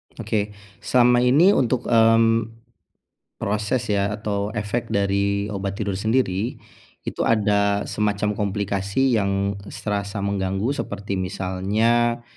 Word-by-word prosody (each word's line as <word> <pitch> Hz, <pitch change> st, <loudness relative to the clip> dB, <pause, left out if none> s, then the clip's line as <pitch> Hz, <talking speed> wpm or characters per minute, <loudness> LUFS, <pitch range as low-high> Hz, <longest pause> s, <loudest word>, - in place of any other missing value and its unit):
Oke, 105 Hz, -1 st, -2 dB, 0.2 s
selama 125 Hz, -1 st, +4 dB
ini 140 Hz, +10 st, +5 dB
untuk, 125 Hz, -, +1 dB
mmm, 115 Hz, -1 st, +4 dB, 0.9 s
proses 105 Hz, +3 st, -1 dB
ya, 100 Hz, +1 st, 0 dB
atau 105 Hz, -1 st, -3 dB
efek 110 Hz, +3 st, -2 dB
dari 100 Hz, 0 st, 0 dB
obat 100 Hz, -1 st, -3 dB
tidur 100 Hz, -2 st, -3 dB
sendiri, 110 Hz, -1 st, 0 dB, 0.5 s
itu -, -, -4 dB
ada 100 Hz, -2 st, +2 dB
semacam 105 Hz, 0 st, -1 dB
komplikasi 100 Hz, +4 st, 0 dB
yang 100 Hz, 0 st, -1 dB
serasa 100 Hz, -1 st, -4 dB
mengganggu, 100 Hz, +3 st, -1 dB
seperti 100 Hz, -7 st, -4 dB
misalnya 105 Hz, +6 st, 0 dB
105 Hz, 105 wpm, -22 LUFS, 100-115 Hz, 0.9 s, ini